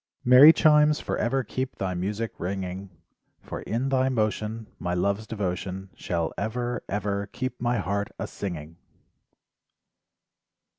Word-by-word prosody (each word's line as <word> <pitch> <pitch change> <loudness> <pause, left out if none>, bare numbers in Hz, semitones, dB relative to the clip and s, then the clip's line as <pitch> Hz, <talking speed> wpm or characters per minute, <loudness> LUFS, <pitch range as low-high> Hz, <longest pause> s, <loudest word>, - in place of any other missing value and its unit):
Merry 130 +5 +10
chimes 150 -1 +5
forever 130 +4 -1
keep 130 +4 -4
thy 95 -1 -2
music 105 +5 -2
ringing 95 +1 -4 0.5
For - - -7
in 125 +5 -2
thy 130 0 +2
motion 110 -1 -1
My 90 0 -2
love's 100 +4 0
devotion 95 -2 -4
Shall 85 -2 -2
ever, 120 +3 -2
ever 100 0 -2
keep 130 -2 -5
my 120 0 +1
heart 100 0 -1
a - - -3
singing. 80 -4 -6
105 Hz, 120 wpm, -26 LUFS, 95-125 Hz, 0.5 s, Merry